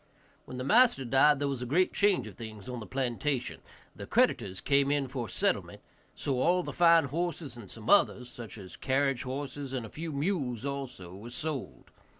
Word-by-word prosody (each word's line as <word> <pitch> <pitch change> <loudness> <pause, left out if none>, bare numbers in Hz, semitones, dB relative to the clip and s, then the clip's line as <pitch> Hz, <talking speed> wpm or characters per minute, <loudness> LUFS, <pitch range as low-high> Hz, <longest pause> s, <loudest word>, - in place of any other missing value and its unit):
When 130 - -8
the 125 - -3
master 220 - +4
died 135 +4 +5
there 145 +1 -1
was 135 -3 -3
a 125 - -4
great 180 +8 +2
change 200 - +3
of 105 - -9
things 110 0 -9
on 125 -1 -5
the 110 - -8
plantation; 130 0 -2 0.3
the - - -8
creditors 95 -1 +2
came 140 -1 +2
in 145 -2 +1
for 125 -4 -4
settlement, - - -1 0.4
so 130 -3 -1
all 180 +4 +3
of - - -9
the - - -5
fine 170 -2 +6
horses, 155 -2 -3
and 115 -5 -11
some 115 -1 -10
others, 125 -11 +4
such 120 -2 -9
as 95 -3 -10
carriage 135 -1 +1
horses, 135 +1 -5
and 125 -4 -3
a - - -9
few 160 +5 -6
mules 140 - -1
also, 130 -11 -5
were 105 +5 -9
sold. 150 +2 -5
135 Hz, 195 wpm, -30 LUFS, 120-150 Hz, 0.4 s, fine